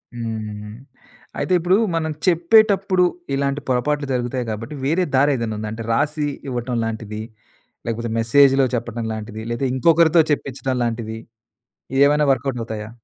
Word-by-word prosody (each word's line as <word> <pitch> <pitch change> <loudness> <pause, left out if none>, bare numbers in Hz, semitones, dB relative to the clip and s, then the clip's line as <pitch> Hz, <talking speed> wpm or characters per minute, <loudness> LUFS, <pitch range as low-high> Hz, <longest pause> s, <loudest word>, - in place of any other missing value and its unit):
హ్మ్. 110 -2 -5 0.6
అయితే 185 - 0
ఇప్పుడు 180 +3 +3 0.2
మనం 160 -1 -1 0.2
చెప్పేటప్పుడు 190 +1 +4 0.3
ఇలాంటి 140 +1 -1
పొరపాట్లు 140 +3 0
జరుగుతాయి 125 0 -2
గాబట్టి, 115 +7 -5
వేరే 165 +6 +2
దారేదైనా 130 -5 +2
ఉందా? 110 0 -4
అంటే 115 +1 -6
రాసి 150 +3 0 0.2
ఇవ్వటం 125 0 -3
లాంటిది? 110 -1 -5 0.6
లేకపోతే 115 0 -3
మెసేజ్‌లో 135 +3 +5
చెప్పడం 115 -1 -4
లాంటిది? 110 0 -6
లేదా 120 +3 -1
ఇంకొకరితో 165 +3 +5
చెప్పించడం 135 -2 -2
లాంటిది? 115 -1 -3 0.8
ఇయేమైనా 145 +1 +4
వర్క్‌అవుట్ 130 -1 -1
అవుతాయా? 110 -1 -6
130 Hz, 125 wpm, -21 LUFS, 115-150 Hz, 0.8 s, మెసేజ్‌లో